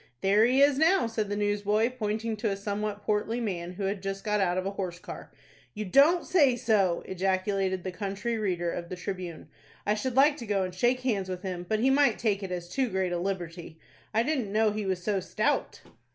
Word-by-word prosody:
"There 205 +3 +4
he 265 +3 +4
is 285 -1 +4
now," 350 +2 +4
said 220 -2 -2
the 205 - -1
newsboy, 205 +2 +1
pointing 220 -1 -2
to 215 +1 -1
a 195 - -2
somewhat 205 +1 -3
portly 215 +3 0
man, 180 -6 -3
who 195 +2 -5
had 195 0 -2
just 195 0 -4
got 210 -1 +1
out 180 -1 +1
of 185 - -1
a 195 - -1
horse 185 -3 -4
car. - - -9 0.4
"You 215 0 -3
don't 290 - +5
say 285 -9 +4
so!" 205 -7 +1
ejaculated 190 0 -1
the 185 - -3
country 205 +5 -3
reader 175 -5 -1
of 170 -1 -5
the 185 - -4
"Tribune." 180 -4 -6 0.4
"I 210 - +2
should 240 +4 -2
like 285 +2 +5
to 235 - -8
go 200 -2 +1
and 185 -1 -4
shake 245 +7 +1
hands 205 -7 -1
with 185 -1 -5
him, 180 -2 -5
but 215 0 +1
he 265 +2 +4
might 275 -4 +4
take 210 -3 0
it 190 -2 -5
as 175 -1 -4
too 255 +7 -1
great 190 -2 -1
a 175 - -1
liberty. 175 -3 -4 0.3
I 225 - +2
didn't 255 -7 -1
know 215 0 +3
he 210 -1 -3
was 185 -2 -2
so 205 -1 +1
stout." - - -1
205 Hz, 225 wpm, -28 LUFS, 185-230 Hz, 0.4 s, don't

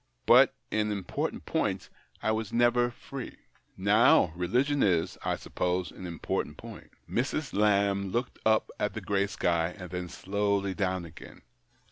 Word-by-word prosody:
But - - +6 0.2
in 105 0 0
important 100 -4 -3
points - - -1 0.3
I 110 - +2
was 110 -2 -2
never 120 +1 +3
free. 125 +1 -8 0.4
Now, 100 -3 +4
religion 125 +11 +1
is, 85 -5 +2
I - - 0
suppose, 90 0 -2
an 95 - -8
important 85 -2 -3
point." - - -11 0.2
Mrs. 135 +3 -2
Lamb 100 -1 +2
looked 120 +5 -3
up 110 0 +2
at 105 - -1
the 110 - -4
grey 100 +1 0
sky, 85 -2 0
and 90 -3 -9
then 90 -1 -4
slowly 100 +1 -1
down 95 -3 -1
again. 80 -1 -13
100 Hz, 145 wpm, -29 LUFS, 90-110 Hz, 0.4 s, But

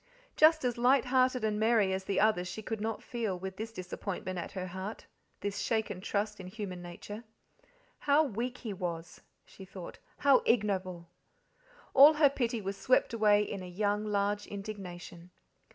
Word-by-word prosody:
Just 310 -2 +5
as 240 -1 -1
light 255 +2 +4
hearted 255 -1 +2
and 210 -1 0
merry 220 -3 +3
as 190 0 -3
the 195 -1 0
others 210 -4 +2
she 220 +4 -6
could 220 0 -4
not 220 0 -3
feel, 225 -6 -3
with 190 +1 -7
this 220 +1 -5
disappointment 185 -1 -5
at 170 - -6
her 185 -2 -4
heart, 190 +4 -6 0.4
this 200 0 -3
shaken 220 -5 -1
trust 205 +1 -2
in 185 - -8
human 185 -2 -6
nature. 190 +5 -8 0.8
How 290 +2 +4
weak 250 -1 -3
he 225 -5 -5
was, 170 -3 -5 0.2
she 195 - -13
thought, 190 -2 -10 0.2
how 280 -2 +5
ignoble! 185 -6 0 0.8
All 285 +3 +9
her 295 -2 +5
pity 240 -4 -1
was 195 0 -4
swept 250 +4 +2
away 210 -2 +4
in 200 -2 -5
a 185 - -7
young, 205 +3 0
large 205 0 -1
indignation. 185 -4 -8
205 Hz, 170 wpm, -31 LUFS, 185-230 Hz, 0.8 s, All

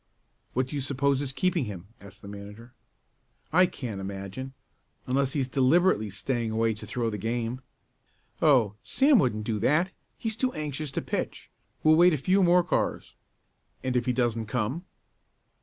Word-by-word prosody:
"What 130 +1 +1
do - - -5
you 140 - -1
suppose 140 +1 +1
is 140 -2 0
keeping 175 0 0
him?" 100 -3 -8
asked 100 -1 -14
the - - -9
manager. 105 +4 -10 0.8
"I 180 +2 +6
can't 115 - -6
imagine. 100 +7 -6 0.5
Unless 135 +1 0
he 145 - 0
is 130 - -1
deliberately 135 - +3
staying 115 +3 -2
away 110 0 +1
to 105 0 -9
throw 115 0 -1
the 105 - -4
game." 115 +3 -2 0.8
"Oh, 125 -9 +4
Sam 275 -2 +4
wouldn't 110 -5 +1
do 110 -1 -2
that. 155 - +2 0.3
He's 220 -2 -2
too 255 +3 0
anxious 150 0 -4
to - - -2
pitch. - - -4 0.3
We'll 155 0 +6
wait 175 +1 +6
a - - +1
few 185 +8 +2
more 180 0 +5
cars." 170 - -1 0.7
"And 130 -1 -1
if 125 0 +1
he - - +3
doesn't 115 -3 0
come?" 125 - -2
130 Hz, 170 wpm, -27 LUFS, 110-155 Hz, 0.8 s, I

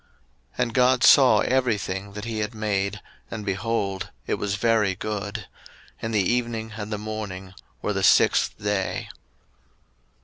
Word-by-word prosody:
01:001:031 - - -26
And 120 -2 0
God 125 +1 +4
saw 135 -3 +7
every 125 -4 +2
thing 100 0 -5
that 105 +1 -6
he 115 -1 -3
had 105 +2 -3
made, 105 -1 -1 0.3
and, 110 -2 -6
behold, 100 -1 -2 0.2
it - - -1
was 100 -1 -1
very 105 -3 +2
good. 105 0 -4 0.6
And 115 - -3
the 105 -2 +2
evening 115 0 -1
and 105 0 -6
the 105 - -1
morning 100 -3 -6 0.3
were 105 - 0
the 95 - -1
sixth - - +4
day. 105 -2 -2
105 Hz, 150 wpm, -24 LUFS, 100-115 Hz, 0.6 s, saw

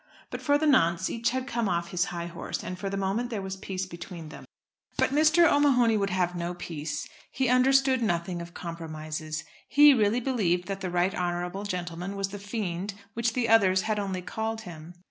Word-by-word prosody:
But - - -5
for 285 0 +3
the 310 - 0
nonce 185 - +3
each 230 0 0
had 260 +1 -2
come 235 -6 -1
off 170 -1 -1
his 180 0 +1
high 170 -2 -4
horse, 170 0 -5
and 185 0 -6
for 195 - -3
the 195 - -3
moment 195 +5 -1
there 225 -4 -3
was 190 0 -4
peace 190 -1 -4
between 170 -2 -9
them. - - -11 0.5
But - - +2
Mr. 310 +4 +5
O'Mahony 255 -7 +4
would 200 -2 +1
have 180 -1 0
no 175 0 -3
peace. 155 -2 -5 0.2
He 260 -1 0
understood 260 +1 +4
nothing 175 -4 -1
of 170 0 -10
compromises. 155 -2 -5 0.3
He 290 0 +8
really 220 -1 +2
believed 200 -9 0
that 195 -1 -4
the 185 - -2
Right 180 +2 +1
Honourable 180 +1 -2
gentleman 180 0 -4
was 195 -1 -2
the 205 +1 -7
fiend 200 -2 -4 0.2
which 235 0 0
the 245 -2 0
others 190 -5 +5
had 215 -1 0
only 190 -3 -3
called 220 +3 -3
him. 170 -3 -10
195 Hz, 200 wpm, -28 LUFS, 175-230 Hz, 0.5 s, He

